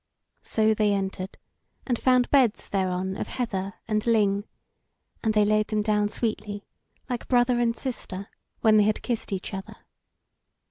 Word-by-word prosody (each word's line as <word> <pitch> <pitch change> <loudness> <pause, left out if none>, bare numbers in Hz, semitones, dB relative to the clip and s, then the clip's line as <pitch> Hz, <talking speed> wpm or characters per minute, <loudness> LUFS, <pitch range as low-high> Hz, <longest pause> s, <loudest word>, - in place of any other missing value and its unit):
So 220 0 +2
they 210 -1 +2
entered, 190 -1 -3 0.5
and 245 -3 0
found 255 -1 +3
beds 260 -7 +3
thereon 190 -1 -1
of - - -3
heather 195 -6 -3
and 215 -1 0
ling, 205 -3 +3 0.8
and 220 -1 +1
they 210 -1 +5
laid 215 0 +2
them 210 -1 0
down 210 -1 +2
sweetly, 210 -2 -3 0.4
like 245 -2 -4
brother 245 -1 +3
and 230 -1 +1
sister, 205 -7 -4 0.3
when 220 -1 +5
they 210 - +6
had 215 0 0
kissed 235 -4 -2
each 195 +2 -4
other. 195 0 -6
215 Hz, 150 wpm, -26 LUFS, 200-235 Hz, 0.8 s, they